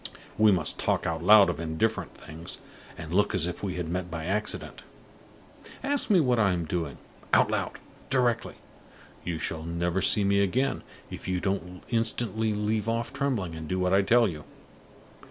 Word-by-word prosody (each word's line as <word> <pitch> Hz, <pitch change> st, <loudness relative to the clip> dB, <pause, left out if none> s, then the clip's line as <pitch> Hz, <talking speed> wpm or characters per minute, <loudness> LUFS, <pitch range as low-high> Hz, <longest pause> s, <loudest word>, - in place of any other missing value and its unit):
We 110 Hz, -1 st, +5 dB
must 85 Hz, -6 st, +1 dB
talk -, -, 0 dB
out 80 Hz, -1 st, -2 dB
loud 105 Hz, +1 st, +8 dB
of 90 Hz, -, -2 dB
indifferent 85 Hz, +3 st, -1 dB
things, 80 Hz, +2 st, -8 dB, 0.4 s
and 80 Hz, 0 st, -7 dB
look 100 Hz, +2 st, +2 dB
as 85 Hz, -3 st, +2 dB
if 90 Hz, -, -5 dB
we 95 Hz, -3 st, -3 dB
had 90 Hz, -2 st, -3 dB
met 90 Hz, +1 st, -3 dB
by 80 Hz, -1 st, -5 dB
accident. 105 Hz, +4 st, -3 dB, 1.0 s
Ask 285 Hz, -1 st, 0 dB
me 195 Hz, -4 st, +5 dB
what 125 Hz, -6 st, +2 dB
I 100 Hz, -4 st, +3 dB
am 85 Hz, -2 st, -2 dB
doing. 80 Hz, -3 st, -3 dB, 0.4 s
Out -, -, +5 dB
loud! -, -, -1 dB, 0.4 s
Directly! 125 Hz, -3 st, +1 dB, 0.7 s
You 85 Hz, -2 st, -3 dB
shall 80 Hz, +1 st, -3 dB
never 85 Hz, +3 st, -1 dB
see 100 Hz, +2 st, +5 dB
me 100 Hz, 0 st, +3 dB
again, 125 Hz, +8 st, 0 dB, 0.3 s
if -, -, -7 dB
you 90 Hz, -1 st, 0 dB
don't 90 Hz, -2 st, -3 dB
instantly 110 Hz, -1 st, 0 dB
leave 105 Hz, +1 st, -1 dB
off 115 Hz, +1 st, -2 dB
trembling 115 Hz, -12 st, -1 dB
and 80 Hz, -1 st, -7 dB
do 95 Hz, -, -1 dB
what 90 Hz, 0 st, +1 dB
I 100 Hz, -, +5 dB
tell 115 Hz, +4 st, +4 dB
you!" 75 Hz, -5 st, -6 dB
95 Hz, 175 wpm, -27 LUFS, 85-110 Hz, 1.0 s, loud